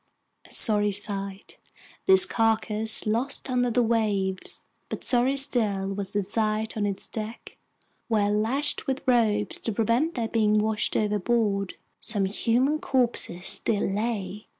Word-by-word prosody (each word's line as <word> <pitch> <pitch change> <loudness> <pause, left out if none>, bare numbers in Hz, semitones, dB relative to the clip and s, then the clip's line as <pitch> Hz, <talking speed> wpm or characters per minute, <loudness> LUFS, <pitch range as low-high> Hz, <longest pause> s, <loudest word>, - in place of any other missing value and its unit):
A - - -17
sorry 210 -2 +2
sight, 200 -1 -5 0.5
this 380 -1 +6
carcass 220 -4 +1
lost 250 +5 -2
under 245 -1 +1
the 240 +1 +2
waves, 205 -5 -1 0.3
but - - -6
sorrier 255 +2 +2
still 220 -8 +2
was 195 -1 -6
the 205 -1 0
sight 215 +2 -2
on 210 -2 -1
its 200 -1 -4
deck, 220 +1 -7 0.5
where, 210 -3 +1
lashed 225 +8 0
with 265 0 -3
ropes 215 -4 +2
to 225 - -4
prevent 230 +9 0
their 235 -3 -2
being 215 -2 +1
washed 215 0 0
overboard, 210 -1 0 0.2
some 205 -3 0
human 245 +9 0
corpses 245 - 0
still 210 -3 +3
lay! 210 -1 -3
220 Hz, 135 wpm, -25 LUFS, 205-240 Hz, 0.5 s, this